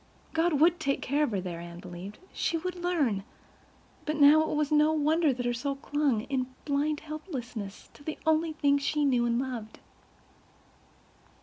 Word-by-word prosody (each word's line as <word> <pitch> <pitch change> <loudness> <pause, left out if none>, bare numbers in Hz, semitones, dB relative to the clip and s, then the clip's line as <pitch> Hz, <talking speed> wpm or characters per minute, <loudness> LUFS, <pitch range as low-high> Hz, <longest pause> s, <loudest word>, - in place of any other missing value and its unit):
God 330 +1 +2
would 330 +4 +4
take 275 0 0
care 285 +3 +1
of - - -3
her 205 -4 -1
there—Anne 170 -1 -6
believed—she 200 - -4
would 365 +3 -3
learn—but 305 - -4
now 295 +1 +7
it 315 - -1
was 300 0 0
no 300 +1 +5
wonder 310 +1 +3
her 245 -1 -1
soul 275 +4 -2
clung, 280 -4 0
in 255 +1 -2 0.2
blind 295 +1 0
helplessness, 255 - -6
to 290 - -16
the 310 +1 -4
only 315 0 +2
things 285 -2 +2
she 295 +1 +1
knew 245 -3 +3
and 235 0 +1
loved. 245 -4 -4
285 Hz, 150 wpm, -29 LUFS, 240-310 Hz, 0.2 s, now